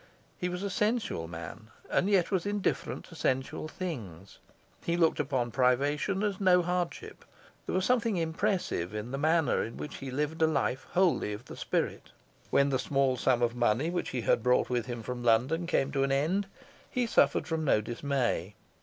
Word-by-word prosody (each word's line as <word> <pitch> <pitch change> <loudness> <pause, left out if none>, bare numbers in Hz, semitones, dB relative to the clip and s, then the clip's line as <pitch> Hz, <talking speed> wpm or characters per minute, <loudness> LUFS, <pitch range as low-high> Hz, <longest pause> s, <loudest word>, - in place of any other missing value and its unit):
He 180 - -2
was 180 +2 -4
a 200 - -2
sensual 210 - 0
man, 85 +6 -8 0.2
and 190 - +1
yet 195 -3 +3
was 190 -1 0
indifferent 205 -1 -2
to 165 - -13
sensual 135 0 -1
things. 110 - -7 0.4
He 170 0 0
looked 165 -2 +3
upon 130 -5 0
privation 145 - +1
as 205 -2 -1
no 180 -2 +5
hardship. 175 0 -3 0.4
There - - -1
was 185 0 +1
something 230 -5 +2
impressive 160 - -1
in 105 +3 -4
the 135 - -3
manner 160 +1 +2
in 115 - -7
which 150 - -6
he 135 - -6
lived 150 +4 -2
a 160 - +6
life 135 -4 -1
wholly 180 - +2
of 105 +4 -8
the - - -9
spirit. - - -2 0.4
When 140 0 +3
the 130 -2 +1
small 135 -2 +1
sum 125 -1 +2
of 120 -1 +2
money 120 +6 +1
which 175 - -2
he 125 - -2
brought 125 +3 +2
with 120 -1 0
him 120 -2 -5
from 125 +2 -5
London 130 +9 +2
came 140 -5 +1
to 140 -1 0
an 135 0 +1
end 165 +9 +1 0.4
he 250 -2 0
suffered 230 - +3
from 160 -2 -2
no 135 - +3
dismay. 120 - -2
145 Hz, 185 wpm, -30 LUFS, 120-180 Hz, 0.4 s, a